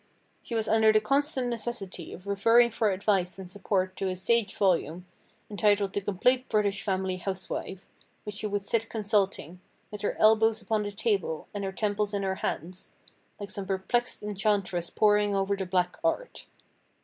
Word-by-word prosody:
"She 235 - -6
was 220 -1 0
under 220 0 +5
the 215 - +4
constant 275 +2 0
necessity 230 -7 -4
of 185 - -10
referring 230 +4 +4
for 220 -1 +1
advice 190 -2 0
and 190 -1 -8
support 185 -1 -1
to 195 - -1
a 185 - -2
sage 225 +4 +1
volume, 180 -3 +1 0.4
entitled 205 -1 +1
'The 205 - -1
Complete 250 +7 +1
British 205 -2 +1
Family 190 -2 -1
Housewife,' 190 0 -4 0.4
which 210 -1 -6
she 215 - -2
would 205 -1 -2
sit 225 +1 -1
consulting, 200 -5 -1 0.3
with 210 -1 -7
her 205 - -2
elbows 220 0 +5
upon 215 0 -1
the 205 0 -3
table, 200 -6 -1
and 205 -1 -4
her 195 - -2
temples 205 +1 -1
in 200 - -1
her 190 0 -1
hands, 180 +4 -4 0.5
like 200 -2 -6
some 195 -2 -4
perplexed 200 +6 -1
enchantress 200 -4 -1
poring 210 -1 +3
over 195 +1 +1
the 190 -2 -4
Black 180 -1 0
Art. 330 +10 -2
205 Hz, 170 wpm, -28 LUFS, 190-220 Hz, 0.5 s, under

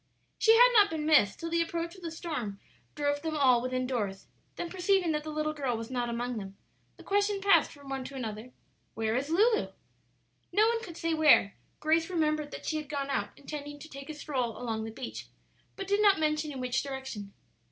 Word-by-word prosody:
She 450 0 +6
had - - +8
not 415 -3 +6
been 315 -2 -3
missed 300 -11 +4
till 330 0 -5
the 335 0 +2
approach 335 0 -3
of 375 - -14
the 335 - -4
storm 300 - -5 0.4
drove 290 -1 0
them 315 -1 -2
all 255 -4 +5
within 255 0 -1
doors; 205 -7 -3 0.3
then 345 - -4
perceiving 370 -1 +1
that 300 -1 -1
the 310 - -6
little 305 0 -1
girl 270 -6 -1
was 225 +2 -7
not 245 -2 -1
among 240 0 -2
them, 195 -1 -9 0.4
the - - -13
question 405 0 +1
passed 395 0 +4
from 285 -2 -14
one 270 -1 -3
to 275 - -8
another, 225 -1 -5 0.4
"Where 220 0 0
is 275 +4 -1
Lulu?" 435 +7 +3 0.8
No 425 +2 +4
one 465 -1 0
could 345 -7 -9
say 330 0 -1
where; 305 -10 +5 0.2
Grace 325 +2 +2
remembered 305 -4 0
that - - -8
she 310 - -1
had 300 -1 -6
gone 280 -2 -2
out 205 -6 -1
intending 290 0 -7
to 290 +2 -11
take 275 -1 -10
a 310 - -5
stroll 255 -6 -2
along 225 -3 -3
the 225 - -6
beach, 115 - -7 0.5
but 390 -2 -6
did 405 +1 +2
not 400 -5 +5
mention 305 0 0
in 270 - -6
which 250 0 0
direction. 265 -8 -6
295 Hz, 215 wpm, -30 LUFS, 250-330 Hz, 0.8 s, had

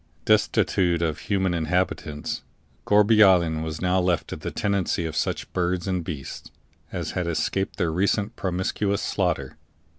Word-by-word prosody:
Destitute 85 -3 +2
of 80 -3 -1
human 95 -3 +1
inhabitants, 80 -3 -1 0.5
Gourbi 105 +1 +6
Island 85 -5 +4
was 80 +2 -5
now 90 +1 +3
left 90 -3 0
to - - -4
the - - -5
tenancy 100 -4 -1
of 80 -1 -4
such - - -2
birds 90 0 -1
and 90 -2 -1
beasts 75 -5 -7 0.4
as - - -3
had 90 -2 -2
escaped 95 +3 -1
the 85 -2 0
recent 100 +5 0
promiscuous 95 +2 -1
slaughter. 85 -8 -1
90 Hz, 145 wpm, -25 LUFS, 80-95 Hz, 0.5 s, Gourbi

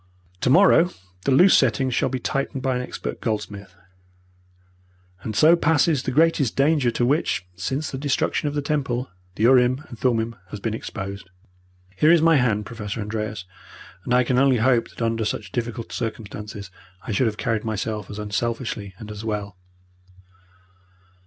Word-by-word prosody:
Tomorrow 175 - +5 0.4
the - - +2
loose 180 +9 +6
settings 130 0 +2
shall - - +1
be 130 - -2
tightened 135 +1 -3
by 130 -1 +1
an 125 - -1
expert 125 - -6
goldsmith, 100 -4 -4 1.5
and 110 +1 -5
so 160 +8 +6
passes 160 -3 +2
the - - -3
greatest 150 -3 +2
danger 140 -2 +3
to 120 +1 0
which, 135 - 0
since 130 - -3
the 130 - -5
destruction 145 +1 0
of 145 - -3
the 145 - -1
Temple, 130 -5 -2 0.2
the 110 - -2
urim 130 +3 +4
and 120 - -10
thummim 115 -2 0
has 105 - -7
been 110 +2 -2
exposed. 100 -3 -6 0.7
Here 150 +11 +4
is 170 - +6
my 165 0 +5
hand, 110 -5 +1
Professor 110 -2 -6
Andreas, 105 -2 -4 0.6
and - - -5
I 125 0 +5
can 125 +1 +1
only 135 -2 +4
hope 120 +1 +2
that - - -6
under 115 0 0
such 110 - -3
difficult 120 -1 -4
circumstances 105 -3 -6 0.3
I 125 - -5
should 120 +4 +2
have 105 -1 -3
carried 110 -1 -1
myself 110 -2 -3
as 105 - -7
unselfishly 105 -1 -3
and 105 +1 -9
as 105 0 -8
well." 105 -3 -4
120 Hz, 165 wpm, -23 LUFS, 105-135 Hz, 1.5 s, loose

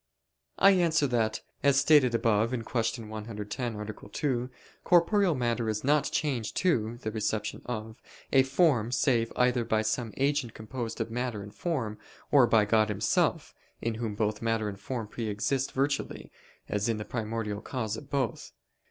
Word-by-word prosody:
I 195 - +7
answer 170 -5 +3
that, 115 -4 0 0.2
As 140 -1 +4
stated 140 -4 +5
above 115 -1 +2
(Q. 115 -1 -2
110, 110 +2 -5
A. 105 -1 -7
2), 125 +1 -1 0.3
corporeal 180 0 +4
matter 120 -2 0
is 105 -1 -2
not 145 +2 +3
changed 130 -8 -2
to 120 -11 +1
(the 110 -3 -4
reception 110 0 -2
of) 110 -2 -5 0.3
a 135 - +7
form 130 -4 +2
save 120 -3 +2
either 125 -1 +2
by 110 -1 +1
some 110 +1 -1
agent 140 -4 0
composed 115 +1 -5
of 115 - -3
matter 120 -3 -3
and 105 +1 -11
form, 125 -12 -3 0.3
or 135 -4 +6
by 110 -3 +4
God 110 +1 +3
Himself, 105 - 0 0.3
in 115 - -1
whom 110 -2 -4
both 105 0 -1
matter 115 -1 0
and 100 -1 -6
form 115 +1 -4
pre 115 +1 -5
exist 105 +6 -1
virtually, 140 +1 -2 0.4
as 105 +2 -1
in 115 - 0
the 105 - -5
primordial 110 -2 -3
cause 110 -5 -3
of 140 - -10
both. 135 -6 -2
115 Hz, 160 wpm, -29 LUFS, 110-130 Hz, 0.4 s, I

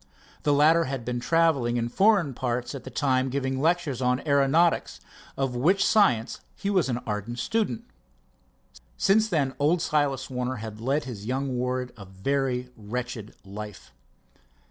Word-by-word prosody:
The 145 - +1
latter 155 +4 +5
had 130 -3 -4
been 125 0 -2
traveling 140 -5 +2
in 115 0 0
foreign 190 - +3
parts 120 0 -2
at 135 -2 -8
the - - -6
time 130 0 +1
giving 130 0 -2
lectures 160 -5 +1
on 125 0 +2
aeronautics, 145 +4 +2 0.4
of 135 -2 -1
which 175 +11 +3
science 125 - +3 0.2
he 200 - -2
was 185 -8 +2
an 120 - 0
ardent 105 +2 -4
student. 225 - -1 1.1
Since 215 +2 +3
then 140 -7 0
old 155 +5 +3
Silas 145 -5 0
Warner 125 0 -3
had 110 -1 -7
led 140 +5 0
his 110 -5 -7
young 130 +1 -1
ward 125 0 -2
a 100 - -10
very 125 +6 -2
wretched 115 0 -6
life. 105 +1 -9
130 Hz, 150 wpm, -26 LUFS, 120-155 Hz, 1.1 s, latter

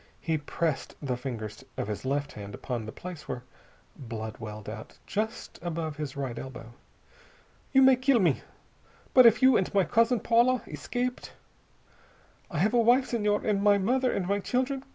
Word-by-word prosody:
He 160 -2 -1
pressed 155 0 -2
the 135 -4 -2
fingers 115 -5 -6
of - - -2
his 105 +3 -5
left 145 +2 -1
hand 100 -1 -8
upon 120 -4 -4
the - - -5
place 180 0 -9
where 120 - -5 0.5
blood 110 -3 -6
welled 105 -2 -8
out, 110 +1 -8
just 220 +3 -4
above 165 -3 -3
his 150 -2 -5
right 135 -4 -3
elbow. 125 -3 -9 1.0
"You 270 -1 +6
may 260 -1 +7
kill 255 -1 +3
me. 170 -8 +2 0.7
But 255 -2 +9
if 230 +3 +4
you 260 -2 +7
and 185 - 0
my 195 - +5
cousin 230 +4 +3
Paula 240 +3 +3
escaped.... 250 0 -4 1.2
I 170 - -5
have 210 +9 +2
a 240 - +4
wife, 245 +3 +4
Senhor, 210 -3 +1
and 205 -2 +1
my 205 0 +5
mother, 250 +6 +1
and 185 - -1
my 200 +1 +1
children. 260 +5 -1
180 Hz, 175 wpm, -28 LUFS, -, 1.2 s, But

